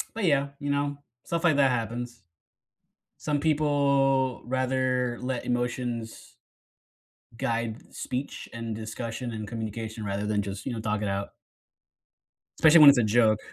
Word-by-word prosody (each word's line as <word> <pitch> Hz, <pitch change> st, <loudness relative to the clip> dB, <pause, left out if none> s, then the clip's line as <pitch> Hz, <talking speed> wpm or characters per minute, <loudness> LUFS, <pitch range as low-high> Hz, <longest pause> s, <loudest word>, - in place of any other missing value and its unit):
But, 225 Hz, -3 st, -2 dB
yeah, 140 Hz, -4 st, +3 dB
you 145 Hz, 0 st, -3 dB
know, 145 Hz, 0 st, -1 dB, 0.3 s
stuff 170 Hz, +1 st, -2 dB
like 155 Hz, -4 st, +4 dB
that 135 Hz, -2 st, +4 dB
happens. 120 Hz, 0 st, -3 dB, 1.0 s
Some 150 Hz, -1 st, -1 dB
people 140 Hz, -4 st, +2 dB
rather 130 Hz, -1 st, 0 dB
let 125 Hz, -1 st, -3 dB
emotions 120 Hz, -2 st, -3 dB, 1.0 s
guide 115 Hz, -1 st, -3 dB
speech, 130 Hz, +2 st, -5 dB
and 115 Hz, -1 st, -4 dB
discussion, 115 Hz, +2 st, -5 dB
and 110 Hz, -1 st, -5 dB
communication 110 Hz, -1 st, -5 dB
rather 100 Hz, +1 st, -2 dB
than 105 Hz, -1 st, 0 dB
just, 100 Hz, 0 st, -6 dB
you 130 Hz, -, -2 dB
know, 115 Hz, -, -4 dB
talk 105 Hz, -1 st, -1 dB
it 105 Hz, -, -1 dB
out 100 Hz, 0 st, -3 dB, 1.3 s
especially 160 Hz, 0 st, +7 dB
when 150 Hz, -, +11 dB
it's 140 Hz, -, +3 dB
a 115 Hz, -, +3 dB
joke. 110 Hz, 0 st, +4 dB
120 Hz, 140 wpm, -27 LUFS, 110-140 Hz, 1.3 s, when